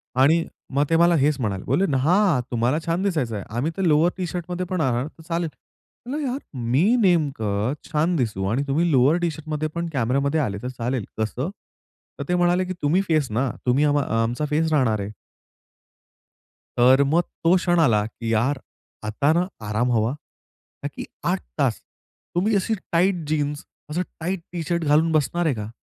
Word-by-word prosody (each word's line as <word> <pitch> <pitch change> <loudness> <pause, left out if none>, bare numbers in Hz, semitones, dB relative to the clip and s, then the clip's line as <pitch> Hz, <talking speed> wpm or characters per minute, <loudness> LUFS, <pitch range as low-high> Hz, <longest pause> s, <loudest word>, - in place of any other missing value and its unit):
आणि 160 +6 +4 0.3
मग 140 +1 +3
ते 165 - +3
मला 170 0 +5
हेच 145 0 +3
म्हणाले, 100 -5 -2
बोलले 145 +11 +1
ना 140 -6 +1
"हां, 170 0 +3
तुम्हाला 120 +5 +1
छान 170 +3 0
दिसायचं 150 - 0
आहे. 100 - -4
आम्ही 150 +7 0
तर - - -1
लोअर 165 +1 +4
टी-शर्टमध्ये 180 0 -3
पण 180 -2 -2
येणार, 130 0 0
तर 160 - -15
चालेल." 170 -1 -1 0.6
म्हणालो 285 +3 -3
"यार, 260 +3 -2
मी 125 +7 +1 0.2
नेमकं 135 - +1 0.2
छान 160 +4 +1
दिसू 105 -8 -1
आणि 135 +5 +1
तुम्ही 165 +4 +1
लोअर 135 +5 +4
टी-शर्टमध्ये 155 -2 -2
पण 170 0 -2
कॅमेरामध्ये 140 +5 +1
आलात, 100 -6 -2
तर - - -3
चालेल 120 -2 -2
कसं?" 120 +8 -2 0.7
तर - - -2
ते 180 - +2
म्हणाले, 175 +1 +2
की 185 - -4
"तुम्ही 160 +7 +3
फेसना, 135 -5 +1 0.2
तुम्ही 130 +4 +3
अ 145 - +3 0.3
आमचा 120 +6 -1
फेस 160 +1 +1
राहणार 125 -8 +2
आहे." 100 +1 -4 1.7
तर 130 +3 +6
मग 165 +4 +3 0.2
तो 170 +3 +5
क्षण 175 -1 +2
आला, 110 -9 +3
की 115 +1 -4
यार 130 +5 +1 0.5
आता 140 +8 +1
ना, 180 +2 +1 0.2
आराम 120 +4 0
हवा, 115 +2 +1 0.7
का - - 0
की - - -5 0.3
8 - - -1 0.2
तास - - +1 0.5
तुम्ही 205 +4 +2
अशी 220 +3 +1 0.2
टाईट 180 +3 +3
जीन्स, 145 -1 -1 0.2
असं 170 +4 -1 0.2
टाइट 175 +2 -2
टी 170 -2 -3
शर्ट 170 -2 0
घालून 155 +3 +3
बसणार 160 +3 +1
आहे 145 -6 +2
का? 105 0 -5
150 Hz, 175 wpm, -23 LUFS, 125-170 Hz, 1.7 s, तर